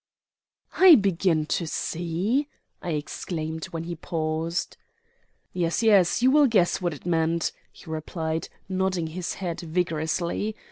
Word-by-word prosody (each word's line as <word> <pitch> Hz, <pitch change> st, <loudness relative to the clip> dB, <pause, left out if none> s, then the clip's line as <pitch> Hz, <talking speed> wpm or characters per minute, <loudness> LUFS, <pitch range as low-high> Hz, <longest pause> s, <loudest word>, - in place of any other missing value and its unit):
"I 370 Hz, -3 st, +9 dB
begin 180 Hz, -, +2 dB
to 165 Hz, +2 st, -1 dB
see," 175 Hz, -, -1 dB, 0.3 s
I 170 Hz, -, -3 dB
exclaimed 160 Hz, +2 st, -4 dB
when 165 Hz, -1 st, -5 dB
he 170 Hz, +1 st, -5 dB
paused. 165 Hz, +2 st, -2 dB, 0.8 s
"Yes, 170 Hz, +4 st, 0 dB
yes, 205 Hz, 0 st, +4 dB
you 260 Hz, -, +6 dB
will 295 Hz, 0 st, +6 dB
guess 195 Hz, -6 st, +2 dB
what 175 Hz, -3 st, -1 dB
it 140 Hz, -, -15 dB
meant," 165 Hz, -1 st, +1 dB, 0.2 s
he -, -, -17 dB
replied, 160 Hz, 0 st, -3 dB, 0.2 s
nodding 185 Hz, -2 st, 0 dB
his 175 Hz, +3 st, -4 dB
head 175 Hz, -3 st, -4 dB
vigorously. 170 Hz, +4 st, -1 dB
170 Hz, 130 wpm, -26 LUFS, 160-190 Hz, 0.8 s, I